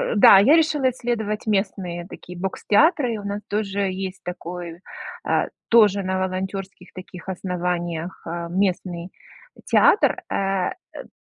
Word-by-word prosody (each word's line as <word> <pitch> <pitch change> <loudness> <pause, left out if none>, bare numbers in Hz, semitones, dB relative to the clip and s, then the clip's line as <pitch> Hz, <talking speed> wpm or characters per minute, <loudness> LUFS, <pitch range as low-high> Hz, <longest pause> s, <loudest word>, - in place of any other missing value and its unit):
да, 205 - +9
я 275 +10 +6
решила 305 -5 +3
исследовать 225 -4 -3
местные 190 -4 -1
такие 180 -2 -11
бокстеатры, 230 - +2
у - - -9
нас 200 +1 -4
тоже 200 -2 -1
есть 185 0 -5
такой, 175 -1 -7 0.4
а, - - +1 0.2
тоже 205 -4 +5
на 185 0 -1
волонтёрских 190 0 -4
таких 185 0 -10
основаниях, 175 -2 -3
а, 170 0 -4
местный 180 -2 -1 0.6
театр, - - +4
э, 195 -1 0 0.3
д - - -21
190 Hz, 125 wpm, -23 LUFS, 180-205 Hz, 0.6 s, да